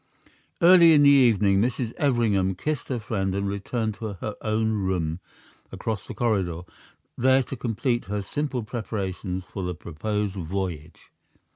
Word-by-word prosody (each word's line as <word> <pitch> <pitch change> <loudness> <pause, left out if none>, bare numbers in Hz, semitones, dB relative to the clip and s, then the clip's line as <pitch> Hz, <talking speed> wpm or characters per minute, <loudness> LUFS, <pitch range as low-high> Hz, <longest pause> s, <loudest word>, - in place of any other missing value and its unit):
Early 170 -2 +8
in 145 -1 +6
the 140 - +7
evening 105 -8 +4
Mrs. 120 0 -1
Everingham 110 - +1
kissed 150 +8 -3
her 130 - -2
friend 100 -5 -2
and 100 0 -1
returned 110 +3 -2
to 110 -3 -4
her 105 +3 -6
own 110 0 0
room 90 -5 -1 0.5
across 110 -2 -4
the - - -7
corridor, 95 -8 0 0.5
there 130 +2 +3
to 135 - -7
complete 120 0 -1
her 100 +1 -3
simple 140 -1 -3
preparations 95 -4 -4
for 95 - -7
the 90 -1 -3
proposed 100 +5 -3
voyage. 85 -3 -5
105 Hz, 145 wpm, -25 LUFS, 95-120 Hz, 0.5 s, Early